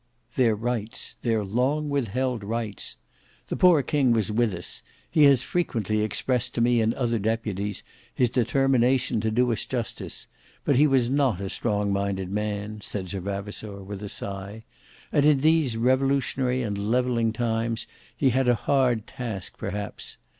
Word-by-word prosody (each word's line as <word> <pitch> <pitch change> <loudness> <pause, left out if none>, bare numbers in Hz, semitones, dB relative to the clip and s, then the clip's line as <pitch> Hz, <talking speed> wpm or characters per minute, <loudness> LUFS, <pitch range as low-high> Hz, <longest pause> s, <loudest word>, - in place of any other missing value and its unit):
"Their 120 -4 +3
rights; 115 0 -4
their 115 -3 +1
long 130 +9 0
withheld 130 -3 -1
rights. 110 -1 -4 0.5
The - - -1
poor 175 -6 +5
king 130 -2 +2
was 110 -3 0
with 115 0 +2
us. 85 - -3 0.3
He 155 -3 +6
has 135 -3 +5
frequently 110 - -1
expressed 120 +3 -1
to - - -1
me 120 0 +4
and 110 +1 +1
other 120 -3 0
deputies, 105 -2 -2 0.3
his 125 -2 +1
determination 130 -1 +2
to 110 - 0
do 120 +2 +2
us 110 - -1
justice; 120 -3 -4 0.4
but 140 - +3
he 145 +4 +6
was 130 -3 +2
not 135 -9 +2
a 95 -1 -4
strong 105 -3 0
minded 100 -1 -2
man," 105 0 -3
said 100 -2 -5
Sir 100 - -3
Vavasour, 100 +1 -5
with 100 +1 -7
a 105 - -5
sigh; 100 +3 -5 0.5
"and 145 - +3
in 145 -2 +4
these 155 -6 +3
revolutionary 130 0 +1
and 105 -3 -2
levelling 120 -2 +2
times, 115 0 -1 0.3
he 135 -3 +3
had 130 +1 +2
a 120 - +5
hard 125 -2 +1
task 110 -7 -6
perhaps. 100 0 -5
115 Hz, 160 wpm, -26 LUFS, 105-130 Hz, 0.5 s, He